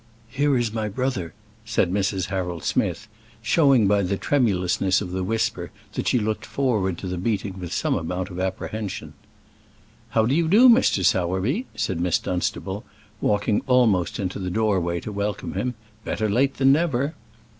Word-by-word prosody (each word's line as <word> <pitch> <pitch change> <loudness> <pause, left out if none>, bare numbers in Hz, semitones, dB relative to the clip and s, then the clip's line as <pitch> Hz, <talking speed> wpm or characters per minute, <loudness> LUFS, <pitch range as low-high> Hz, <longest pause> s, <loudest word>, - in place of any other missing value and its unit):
"Here 140 +2 +1
is 120 -3 -1
my 110 -1 -2
brother," 105 - -3 0.3
said 110 -5 0
Mrs. 95 -2 -1
Harold 90 -3 -3
Smith, 110 - -1 0.4
showing 135 -2 +4
by 100 +1 +3
the 95 +1 -1
tremulousness 95 -8 +1
of 90 -4 -5
the 95 0 -2
whisper 110 +4 -1 0.2
that - - -3
she - - +3
looked 110 -1 -1
forward 105 -10 0
to 95 - -6
the 90 -1 -3
meeting 100 -1 -2
with 90 -2 -6
some - - 0
amount 90 +3 -3
of 90 - -6
apprehension. 95 +2 -4 1.0
"How 110 -1 +2
do 125 - +1
you 165 +2 +2
do, 220 +9 +7
Mr. 230 - +4
Sowerby?" 95 +8 +1
said 105 -5 -2
Miss 90 -1 +2
Dunstable, 90 -1 -3 0.4
walking 105 0 +1
almost 110 -9 +3
into 95 0 -3
the 90 -1 -3
doorway 90 -4 0
to 110 - -6
welcome 100 0 -3
him. 125 -1 -2 0.3
"Better 110 - -1
late 130 +6 +1
than 135 0 +4
never." 145 -2 +1
105 Hz, 165 wpm, -24 LUFS, 95-125 Hz, 1.0 s, do